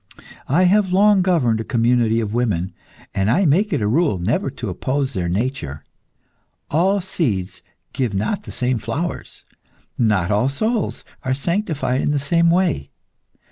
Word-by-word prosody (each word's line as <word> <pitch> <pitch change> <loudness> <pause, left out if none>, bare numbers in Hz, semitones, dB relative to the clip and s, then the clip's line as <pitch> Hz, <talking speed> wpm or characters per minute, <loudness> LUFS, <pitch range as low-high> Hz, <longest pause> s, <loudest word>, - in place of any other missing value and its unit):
I 165 +8 +3
have 190 +1 +3
long 200 +1 +5
governed 140 -12 +2
a - - -4
community 115 -1 +2
of 105 -1 -3
women, 105 -7 -1 0.4
and 95 +2 +1
I 185 - +3
make 190 +8 +2
it 110 - 0
a - - +1
rule 145 - +2
never 100 +9 0
to 125 -4 -6
oppose 130 +9 -2
their 90 -5 -2
nature. 95 - -3 0.9
All 190 +6 +2
seeds 115 - -2 0.3
give 125 -7 -1
not 150 - -1
the - - -10
same 125 -1 -1
flowers. 130 +11 -4 0.6
Not 105 -6 +2
all 105 +6 +2
souls 220 - -1 0.2
are 130 0 -1
sanctified 155 -5 -1
in - - 0
the 145 - +1
same 165 +4 +2
way. 170 - +1
130 Hz, 155 wpm, -20 LUFS, 110-175 Hz, 0.9 s, long